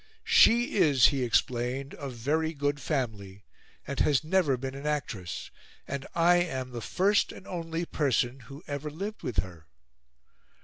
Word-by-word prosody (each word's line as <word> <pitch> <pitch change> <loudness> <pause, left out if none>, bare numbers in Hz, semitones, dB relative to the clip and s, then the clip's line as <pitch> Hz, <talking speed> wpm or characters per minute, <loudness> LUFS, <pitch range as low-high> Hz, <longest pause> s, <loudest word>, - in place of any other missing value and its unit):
"She 235 -1 +5
is," 145 -9 +6
he 140 -3 -2
explained, 125 +3 0
"of 140 -3 -6
very 155 +7 -1
good 145 0 -1
family, 105 -9 -3 0.4
and 140 - -4
has 145 0 +3
never 155 -5 +2
been 130 +1 -5
an 140 +2 -6
actress, 120 -12 -4 0.4
and 140 0 -5
I 175 +1 +5
am 130 -8 -2
the 120 -1 -6
first 200 - +2
and - - -12
only 165 -1 -4
person 135 -5 0
who 135 +5 -12
ever 145 +1 -4
lived 200 +8 -6
with 95 -7 -1
her. 85 -5 -13
140 Hz, 150 wpm, -28 LUFS, 125-160 Hz, 0.4 s, is